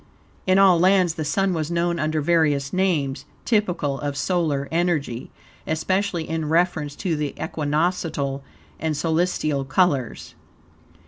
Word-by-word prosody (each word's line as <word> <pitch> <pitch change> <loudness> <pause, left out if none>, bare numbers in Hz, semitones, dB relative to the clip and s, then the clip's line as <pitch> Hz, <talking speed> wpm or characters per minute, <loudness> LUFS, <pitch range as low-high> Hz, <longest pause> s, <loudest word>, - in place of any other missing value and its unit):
In 185 0 +4
all 190 -3 +6
lands 185 -1 +4
the 160 - -4
Sun 190 +5 +1
was 155 -2 -2
known 170 0 0
under 155 0 0
various 145 -4 +1
names, 165 -8 0 0.2
typical 180 - 0
of 145 -1 -3
solar 155 -6 0
energy, 160 -8 -1 0.4
especially 175 +1 -1
in 160 -2 -2
reference 160 -3 +1
to 180 -5 -2
the 150 -2 -3
equinoctial 150 -2 -1 0.4
and 155 -2 -1
solstitial 160 -3 0
colures. 135 -2 0
160 Hz, 125 wpm, -23 LUFS, 145-180 Hz, 0.4 s, all